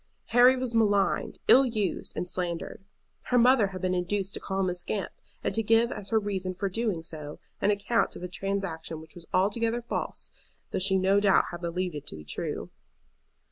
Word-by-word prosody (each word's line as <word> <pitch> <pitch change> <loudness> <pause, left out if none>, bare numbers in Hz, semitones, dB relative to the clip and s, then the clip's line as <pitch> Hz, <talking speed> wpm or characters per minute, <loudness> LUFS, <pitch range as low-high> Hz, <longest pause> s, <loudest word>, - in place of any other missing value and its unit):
Harry 245 +2 +6
was 255 -2 -1
maligned, 205 -3 +2
ill 265 - +8
used, 215 -7 -2
and 180 - -3
slandered. 175 +1 -4 0.4
Her 250 - +2
mother 245 -3 +5
had 190 -1 -7
been 185 -1 0
induced 190 +2 -1
to - - -4
call 195 0 -2
him 185 - +1
a - - -1
scamp, 185 +3 -2 0.3
and - - -1
to 225 - +1
give 225 +2 +3
as 200 - -6
her 225 - +3
reason 190 -3 -2
for 195 +2 -2
doing 205 -5 -1
so 150 -3 -6 0.2
an - - +3
account 210 +3 +1
of - - -8
a - - -2
transaction 180 -4 -3
which 160 0 -13
was 170 -2 -11
altogether 225 +5 +1
false, 235 - -3 0.4
though - - -1
she 190 +1 +3
no 190 +2 +3
doubt 200 -2 +4
had 175 -1 -7
believed 180 +1 -2
it 145 -1 -7
to - - -6
be 75 -1 -10
true. 75 - -4
195 Hz, 200 wpm, -28 LUFS, 180-225 Hz, 0.4 s, ill